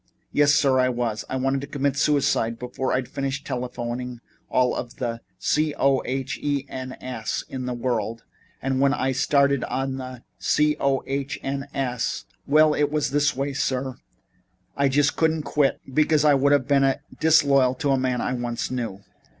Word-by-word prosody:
"Yes, 145 0 +4
sir, 135 -4 +3
I 130 0 +3
was. 120 -3 -2
I - - -2
wanted 135 +1 0
to 140 - -6
commit 140 -1 -1
suicide 140 -6 +1
before 125 +2 -3
I'd 130 -1 0
finished 135 +1 -3
telephoning 125 0 -4 0.3
all 125 -1 +3
the 120 -1 -4 0.2
C 150 0 +1
o 135 -1 +3
h 135 +1 -3
e 145 -2 -1
n 130 -1 -6
s 125 -5 -4
in 130 -1 -5
the 125 - -2
world. 115 -2 -2 0.4
And 135 0 0
when 140 +1 +4
I 135 - 0
started 140 0 +2
on 135 0 -2
the 130 -2 -8 0.2
C 150 0 +2
o 135 -1 +1
h 140 0 -3
n 135 +1 -3
s 125 -4 -2 0.2
well, 155 +1 +5
it's 150 0 0
this 145 +1 +2
way, 140 +1 -2
sir. 130 -1 -2 0.8
I 140 0 +2
just 145 +2 +2
couldn't 160 -1 +1
quit 145 -2 +1
because 155 +1 +3
that 145 -2 +5
would 140 +1 +3
have 140 -3 +3
been 135 -2 +3 0.2
disloyal 140 -5 +4
to 140 +2 0
a 135 - +3
man 130 -1 0
I - - -1
once 120 -1 -3
knew." 115 -6 -4
135 Hz, 175 wpm, -24 LUFS, 125-140 Hz, 0.8 s, well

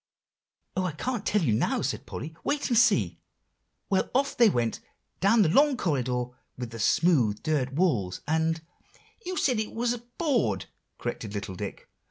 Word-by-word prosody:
"Oh, 185 - 0
I 180 -4 -1
can't 240 - -3
tell 210 -3 +2
you 120 -8 +2
now!" 110 - +1
said - - -3
Polly; 160 +2 -6
"wait 290 0 -1
and 240 - +2
see. 105 - +3 0.7
Well, 190 - +1
off 275 +1 +2
they 235 -2 +6
went 120 - 0 0.4
down 210 +3 +5
the 165 - +2
long 280 - +4
corridor 125 - 0 0.3
with 120 -2 -5
the 115 - -7
smooth 120 - +3
dirt 135 -4 0
walls, 125 - +1
and" 160 +1 +1 0.6
"You 370 0 -3
said 250 -5 +2
it 215 - -3
was 240 +1 +1 0.2
board," 235 - +1 0.3
corrected 105 -1 -5
little 100 -2 -4
Dick. 90 - -7
160 Hz, 165 wpm, -27 LUFS, -, 0.7 s, they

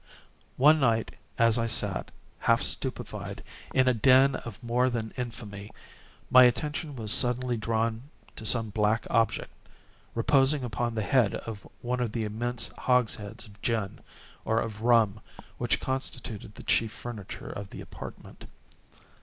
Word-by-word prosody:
One 150 +4 +6
night 115 -5 +2 0.3
as 115 0 +4
I 115 - 0
sat, 105 -4 -1 0.3
half - - +3
stupefied, - - -3 0.3
in 130 -1 +3
a 130 - +5
den 130 +4 +5
of 115 -4 -7
more 125 +2 +2
than 115 -3 -3
infamy, 110 -5 -6 0.6
my 130 0 +9
attention 150 +3 -1
was 110 -4 -2
suddenly 125 0 +3
drawn 115 +3 -1 0.3
to - - -8
some 110 -1 +1
black 105 +2 +1
object, 115 -1 +1 0.6
reposing 135 +3 +3
upon 120 -1 -2
the 110 - -1
head 120 -5 +3
of 110 -3 -7
one 125 +1 -1
of 120 -3 -1
the 115 - -1
immense 115 +3 -2
hogsheads 115 -3 0
of 105 -2 -17
gin, 110 -5 -1 0.4
or 110 +1 +1
of 110 -2 -4
rum, 115 -3 +4 0.4
which - - +1
constituted 125 -5 -4
the - - -10
chief 115 -1 +2
furniture 115 -6 -7
of 100 -1 -7
the - - -9
apartment. - - -10
115 Hz, 145 wpm, -28 LUFS, 110-125 Hz, 0.6 s, my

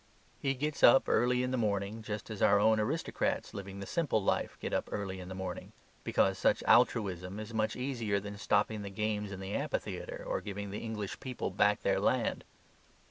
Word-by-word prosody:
He 135 -1 0
gets 150 +2 -2
up 135 - +7
early 125 +2 +3
in 125 - -1
the 130 - 0
morning, 105 0 -1
just 105 0 -5
as 105 - -6
our 100 0 +5
own 110 +1 +4
aristocrats 130 +10 -1
living 100 0 -7
the 100 - -5
Simple 150 - 0
Life - - 0
get - - -4
up - - -1
early 95 -2 -3
in 90 0 -8
the 95 - -6
morning; 95 -1 -6 0.3
because - - +2
such - - +2
altruism 95 -2 +3
is 110 +1 -7
much 110 -1 0
easier 120 -6 -1
than 100 0 -8
stopping 105 +1 +1
the 100 - -5
games 105 0 -2
of 95 - -6
the 95 +1 -5
amphitheatre - - -3
or - - -1
giving 100 -1 -5
the 105 - -4
English 105 -3 -5
people 130 -2 -4
back - - +2
their - - +2
land. - - +1
105 Hz, 195 wpm, -32 LUFS, 100-115 Hz, 0.3 s, up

